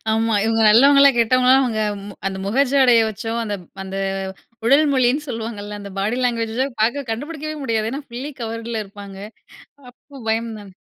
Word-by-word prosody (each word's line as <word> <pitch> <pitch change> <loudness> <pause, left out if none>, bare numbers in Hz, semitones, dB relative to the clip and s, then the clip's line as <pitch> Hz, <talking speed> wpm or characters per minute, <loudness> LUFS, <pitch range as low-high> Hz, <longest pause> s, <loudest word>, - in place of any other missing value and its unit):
ஆமா, 225 0 +1
இவங்க 225 0 +1
நல்லவங்களா? 275 +5 +7
கெட்டவங்களா? 255 +3 +4
அவங்க 225 -4 -1 0.5
அந்த 190 0 -3
முக 265 +7 +2
ஜாடைய 255 -4 +5
வச்சோ, 220 +2 -5
அந்த 205 -1 -3 0.3
அந்த 190 0 -6 0.7
உடல் 280 +6 +5
மொழின்னு 265 +3 +2
சொல்லுவாங்கல்ல 215 -3 -5
அந்த 200 -1 -8
பாடி 215 +6 -1
லேங்குவேஜ 235 +1 0 0.2
பார்க்க 250 +3 0
கண்டுபிடிக்கவே 310 +5 -5
முடியாது. 225 -3 -1
ஏனா, 285 +2 -5
ஃபுல்லி 260 +5 -6
கவர்ல 230 0 -4
இருப்பாங்க. 200 -1 -11 0.7
அப்போ 275 +2 -15
பயம் 225 +1 -1
தான். 195 -2 -13
230 Hz, 150 wpm, -20 LUFS, 220-265 Hz, 0.7 s, நல்லவங்களா